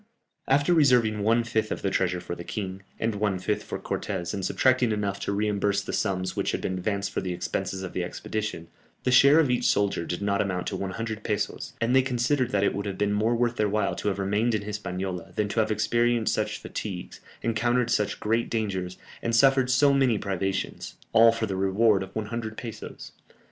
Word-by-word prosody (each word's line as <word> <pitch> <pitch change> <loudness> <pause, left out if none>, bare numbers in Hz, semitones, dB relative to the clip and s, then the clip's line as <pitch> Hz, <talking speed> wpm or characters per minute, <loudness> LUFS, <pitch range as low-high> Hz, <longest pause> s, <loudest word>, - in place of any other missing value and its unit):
After 145 +5 +3
reserving 125 -9 +4
one 115 +3 +3
fifth 110 -2 -1
of - - -4
the 100 - 0
treasure 90 -1 +1
for 85 - -6
the 85 - -7
king, 95 0 -5 0.2
and 115 0 0
one 100 -2 0
fifth 105 +3 -1
for - - -5
Cortès 90 -3 -3
and 100 - -3
subtracting 130 +2 +2
enough 105 -2 -1
to - - -2
reimburse 100 -1 0
the - - -5
sums 95 -3 -1
which - - -1
had - - -2
been - - -2
advanced 100 +1 -2
for - - -2
the 90 -1 -3
expenses 95 +2 -3
of 95 - -6
the 90 - -1
expedition, 105 -1 -4 0.4
the 125 - +1
share 140 +4 +7
of 145 -6 +3
each 125 - 0
soldier 100 -4 +2
did 90 +1 -3
not 100 0 +1
amount 90 -3 -2
to - - -3
100 110 +3 -4
pesos, 105 -2 -2
and 115 +2 +1
they 130 - +7
considered 125 0 0
that 100 -4 +1
it - - +2
would 100 +1 -3
have 95 -1 -4
been 105 0 +1
more 110 +3 +2
worth 120 0 0
their 105 -1 +2
while 105 -1 0
to - - -4
have 100 -1 0
remained 105 +4 +1
in 105 - -2
Hispaniola, 95 -4 -5
than 105 - 0
to 110 - -1
have 110 0 +2
experienced 115 +2 +1
such - - -1
fatigues, 95 -4 -6 0.2
encountered 120 +1 +1
such 105 -2 0
great 115 +2 0
dangers, 95 -5 -2 0.2
and 115 0 0
suffered 135 0 +4
so 140 +2 +4
many 130 -5 +3
privations, 95 -1 -3 0.2
all 115 0 +7
for 115 0 -2
the 100 -3 -3
reward 95 +2 +3
of 95 0 -8
100 110 +1 -4
pesos! 115 -3 -8
105 Hz, 210 wpm, -26 LUFS, 95-115 Hz, 0.4 s, share